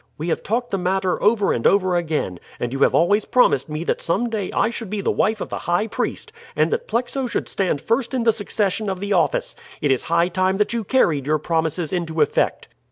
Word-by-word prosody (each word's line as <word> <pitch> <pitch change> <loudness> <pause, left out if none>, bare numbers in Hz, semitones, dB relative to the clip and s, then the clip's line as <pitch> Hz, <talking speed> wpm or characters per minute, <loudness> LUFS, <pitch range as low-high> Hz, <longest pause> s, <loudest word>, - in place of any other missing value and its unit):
We 160 +3 -3
have - - -1
talked 240 +3 -2
the 195 - 0
matter 185 0 0
over 210 -1 +3
and 115 - +1
over 185 -2 +3
again, 155 - -1 0.2
and 120 +1 -3
you 135 - -3
have - - +4
always 205 +5 +3
promised 160 - +2
me 155 +2 -3
that - - -1
some 225 +8 0
day 205 -4 -2
I 225 - +1
should 230 -3 -6
be 210 +1 -3
the - - +1
wife 215 +1 +1
of - - -4
the - - -4
high 175 +5 0
priest, 450 - -4 0.2
and - - +2
that 470 +1 -2
Plexo 245 +2 -1
should - - -2
stand 180 -7 -1
first 240 +3 0
in 250 - 0
the 225 -1 +4
succession 210 -1 -1
of 190 -1 -3
the 200 +1 -1
office. 170 -5 +1 0.2
It 145 - +1
is 130 - +2
high 170 +1 +1
time 185 +1 +1
that 210 +2 +1
you 230 -1 -1
carried 165 - +1
your 155 +1 +3
promises 160 +2 -1
into 165 -3 -2
effect." - - +1
190 Hz, 230 wpm, -21 LUFS, 165-220 Hz, 0.2 s, have